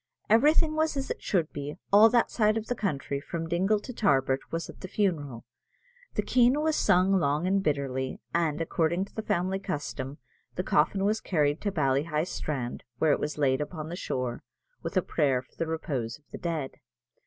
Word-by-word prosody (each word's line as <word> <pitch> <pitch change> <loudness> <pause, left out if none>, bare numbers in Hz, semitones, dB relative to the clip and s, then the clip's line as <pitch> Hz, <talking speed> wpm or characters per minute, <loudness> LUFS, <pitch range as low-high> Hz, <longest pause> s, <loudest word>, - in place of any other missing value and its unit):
Everything 305 +7 +5
was 315 -2 +1
as 270 - -2
it - - -5
should 170 -6 0
be; 145 +1 -5 0.2
all 215 +2 +9
that 240 0 +2
side 215 -1 +2
of 220 - -3
the 245 - -1
country, 145 - -2
from 165 +2 -4
Dingle 190 +5 +2
to 250 - -7
Tarbert, 135 - +2
was 165 0 -3
at - - -12
the 185 - -6
funeral. 155 - -1 0.7
The - - +1
Keen 250 +3 +4
was 315 0 +1
sung 190 -3 +4
long 150 +1 +1
and 195 +1 +2
bitterly; 135 -5 -1
and, 165 -3 +1
according 165 +2 0
to - - -21
the 220 - -3
family 190 -1 0
custom, 145 -7 -4 0.4
the 180 - -1
coffin 195 +4 +2
was 215 +2 +1
carried 150 -4 +1
to 205 - -1
Ballyheigh 150 0 +1
strand, 135 -8 -4
where 155 +2 +3
it - - +2
was 150 0 -3
laid 135 -2 +2
upon 155 +1 -5
the 175 - -4
shore, 125 -8 -3 0.4
with - - -3
a 185 - +3
prayer 135 -5 +1
for - - -30
the 165 - -2
repose 135 -8 -3
of 150 - -34
the - - -7
dead. 160 -6 -3
165 Hz, 195 wpm, -28 LUFS, 145-200 Hz, 0.7 s, all